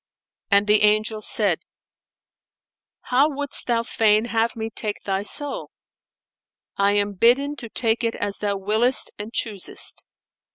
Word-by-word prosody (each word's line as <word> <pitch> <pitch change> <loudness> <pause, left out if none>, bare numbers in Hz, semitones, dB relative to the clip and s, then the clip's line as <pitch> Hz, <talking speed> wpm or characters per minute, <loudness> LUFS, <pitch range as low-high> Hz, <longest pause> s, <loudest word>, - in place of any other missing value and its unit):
And 200 -1 +4
the 210 0 +4
Angel 215 +1 +2
said - - +1 1.4
"How 270 +4 +2
wouldst 285 -1 -4
thou 235 -1 +1
fain 220 -1 +2
have 230 0 -1
me 225 0 -5
take 210 -1 -4
thy 195 -1 -1
soul? 285 +7 -1 1.1
I 200 0 +2
am 205 0 0
bidden 250 +8 +2
to 230 - -8
take 230 +1 0
it 230 0 -1
as 205 -1 -3
thou 200 -1 -1
willest 220 +6 +2
and 210 +2 -6
choosest." 210 -5 -2
220 Hz, 135 wpm, -22 LUFS, 205-235 Hz, 1.4 s, And